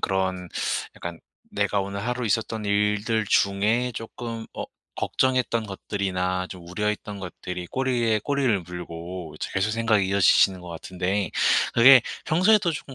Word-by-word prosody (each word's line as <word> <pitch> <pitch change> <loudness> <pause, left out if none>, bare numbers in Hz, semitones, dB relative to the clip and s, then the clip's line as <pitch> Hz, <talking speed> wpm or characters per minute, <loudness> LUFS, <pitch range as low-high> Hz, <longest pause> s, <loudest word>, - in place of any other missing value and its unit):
그런 95 -2 -1 0.5
약간 85 -1 -7 0.3
내가 100 0 0
오늘 100 +2 -4
하루 125 -1 -2
있었던 110 0 -1
일들 105 +2 +1
중에 110 +5 +2
쪼끔 115 0 -6
어 - - -4 0.3
걱정했던 125 -3 0
것들이나 95 -2 -2
좀 85 -2 -10
우려했던 105 +1 -3
것들이 90 -1 -6
꼬리에 120 -4 +1
꼬리를 130 -7 +1
물고 85 0 -7
이제 - - -4
계속 95 +3 +1
생각이 110 -3 +2
이어지시는 95 -1 +4
것 90 - -10
같은데 95 +4 -2 0.4
그게 125 +1 +8 0.2
평소에도 185 +2 +4
쪼끔 140 -2 -7
105 Hz, 315 characters per minute, -25 LUFS, 95-115 Hz, 0.5 s, 그게